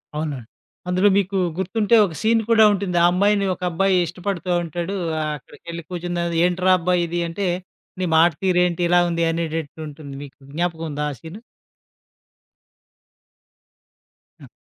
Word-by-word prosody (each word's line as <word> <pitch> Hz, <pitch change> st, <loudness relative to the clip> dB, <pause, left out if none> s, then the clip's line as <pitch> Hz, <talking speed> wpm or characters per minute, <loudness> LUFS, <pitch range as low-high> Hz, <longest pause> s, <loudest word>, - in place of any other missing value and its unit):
అవునండి. 145 Hz, -7 st, -4 dB, 0.4 s
అందులో 185 Hz, +3 st, +3 dB
మీకు 195 Hz, 0 st, 0 dB, 0.2 s
గుర్తుంటే 210 Hz, +4 st, +1 dB
ఒక 170 Hz, -, -6 dB
సీన్ 225 Hz, +1 st, +3 dB
కూడా 225 Hz, -1 st, +6 dB
ఉంటుంది. 190 Hz, -3 st, -2 dB
ఆ -, -, +7 dB
అమ్మాయిని 200 Hz, +2 st, +2 dB
ఒక -, -, -26 dB
అబ్బాయి 195 Hz, +3 st, +2 dB
ఇష్టపడుతా 180 Hz, +1 st, -4 dB
ఉంటాడు. 170 Hz, +4 st, -4 dB, 0.3 s
ఆ -, -, -1 dB
అక్కడికెళ్ళి 170 Hz, +4 st, -10 dB
కూర్చుందర్వాత 175 Hz, -1 st, -3 dB
ఏంటిరా 180 Hz, +1 st, +2 dB
అబ్బాయి 175 Hz, 0 st, +1 dB
ఇది 175 Hz, +1 st, -2 dB
అంటే, 190 Hz, +4 st, -3 dB, 0.5 s
నీ 185 Hz, -, 0 dB
మాటతీరేంటి 175 Hz, +1 st, +2 dB
ఇలా 175 Hz, 0 st, +5 dB
ఉంది? 170 Hz, 0 st, 0 dB
అనేటట్టు 160 Hz, -2 st, -4 dB
ఉంటుంది 145 Hz, -1 st, -10 dB
మీకు 140 Hz, -1 st, -13 dB, 0.2 s
జ్ఞాపకం 165 Hz, 0 st, -2 dB
ఉందా? 150 Hz, +1 st, -2 dB
ఆ -, -, -7 dB
సీను? 170 Hz, +7 st, -10 dB, 3.0 s
హ్మ్. -, -, -13 dB
175 Hz, 135 wpm, -22 LUFS, 165-190 Hz, 3.0 s, ఆ